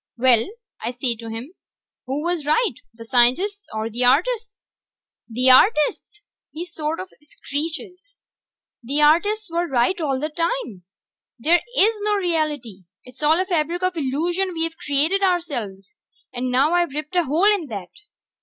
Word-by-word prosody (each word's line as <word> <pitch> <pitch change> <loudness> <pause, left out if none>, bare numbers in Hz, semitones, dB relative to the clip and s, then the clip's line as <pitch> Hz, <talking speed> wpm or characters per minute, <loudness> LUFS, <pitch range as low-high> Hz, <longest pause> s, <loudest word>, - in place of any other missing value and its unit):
"Well," 245 +3 +4 0.3
I 240 - -3
says 245 -2 -2
to 230 -1 -8
him, 230 +9 -7 0.5
"who 275 +3 -2
was 345 -2 -1
right, 310 - +1 0.2
the 230 0 -12
scientists 325 - +2
or 220 0 -3
the 235 +3 -2
artists?" 430 - +1 0.6
"The 250 +3 +4
artists!" 305 - +3 0.3
he 335 +3 -6
sorta 325 +1 -4 0.2
screeches. 330 +6 -5 0.8
"The 280 +5 0
artists 405 +7 +2
were 345 +1 0
right 270 +7 +1
all 275 -4 -1
the 305 +3 -2
time... 320 - -3 0.5
there 330 +9 +3 0.2
is 430 +3 +5
no 415 0 0
reality! 300 - -2 0.2
It's 250 +3 -15
all 310 +3 +3
a 375 - +1
fabric 345 0 -1
of 365 0 0
illusion 340 +6 -1
we've 325 0 -2
created 310 +7 +1
ourselves! 275 - -2 0.4
And 255 +1 -2
now 270 +6 +2
I've 345 -5 +1
ripped 305 +3 -5
a 350 -2 +3
hole 345 +10 +3
in 360 -7 -3
that!" 200 -7 -7
305 Hz, 150 wpm, -22 LUFS, 255-355 Hz, 0.8 s, is